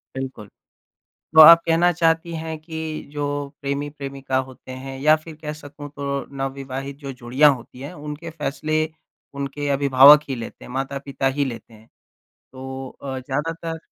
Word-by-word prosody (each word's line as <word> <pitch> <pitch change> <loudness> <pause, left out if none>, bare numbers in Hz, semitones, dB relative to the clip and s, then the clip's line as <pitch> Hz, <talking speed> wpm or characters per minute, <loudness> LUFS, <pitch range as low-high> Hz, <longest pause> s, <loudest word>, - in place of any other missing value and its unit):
बिल्कुल। 130 -6 -6 0.9
तो - - +8
आप 165 +2 +11
कहना 170 +2 +4
चाहती 165 0 +1
हैं 160 -1 -5
कि 160 0 -8 0.4
जो 145 -1 -2 0.4
प्रेमी-प्रेमिका 140 -1 -3
होते 130 0 -12
हैं 135 0 -7
या 155 +2 +5
फ़िर 155 0 -10
कह 150 -1 -4
सकूँ 145 0 -10
तो 140 -2 -3 0.2
नवविवाहित 135 0 -5
जो 140 - -4
जोड़ियाँ 135 +5 +5
होती 125 +1 -13
हैं, 145 +6 -7
उनके 150 +2 -7
फ़ैसले 155 +2 -1 0.6
उनके 140 +1 -3
अभिभावक 140 +1 +7
ही 135 - -1
लेते 115 - -8
हैं, - - -11
माता-पिता 135 0 -2
ही 140 - +2
लेते 115 -2 -7
हैं। 110 +1 -18 0.7
तो 130 0 -10 0.4
अ, 135 -1 -4
ज़्यादातर 165 +5 -3
140 Hz, 150 wpm, -22 LUFS, 135-155 Hz, 0.9 s, आप